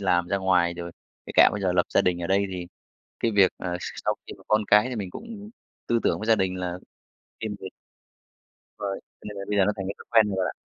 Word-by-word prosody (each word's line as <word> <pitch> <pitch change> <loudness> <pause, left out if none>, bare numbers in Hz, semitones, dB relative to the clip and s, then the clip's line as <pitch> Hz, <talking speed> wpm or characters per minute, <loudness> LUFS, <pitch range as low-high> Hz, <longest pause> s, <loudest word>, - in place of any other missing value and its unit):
làm 90 -3 +2
ra 100 - +1
ngoài, 90 -2 +2
rồi 85 0 -6 0.4
kể - - -7
cả - - +9
bây 105 - -3
giờ 90 -2 +2
lập 90 -1 +2
gia - - +6
đình 90 -1 +1
ở - - -1
đây 100 +2 +2
thì 90 -1 -5 0.5
cái 115 - +2
việc, 100 -3 +5
ờ, 90 -1 -3
s - - -6 0.2
sau - - +2
khi - - -8
có - - -18
con 105 0 +3
cái 105 +4 +6
thì 125 - -4
mình 100 -4 -4
cũng 215 - -9 0.4
tư 120 - +2
tưởng - - +1
với 110 - -4
gia 115 - +6
đình 95 -3 0
là 90 -1 -3 0.6
riêng 110 -2 -3
việc 95 - -7 1.1
rồi, 100 -2 -3
cho - - -79
nên 105 - -8
là 100 - -5
bây 105 -1 +1
giờ 95 - +6
nó 105 - +2
thành 95 -1 -4
cái 100 - -3
thói - - -13
quen 110 -2 +5
rồi 95 - -2
bạn 95 - +1
ạ. - - -3
95 Hz, 270 wpm, -26 LUFS, 90-105 Hz, 1.1 s, cả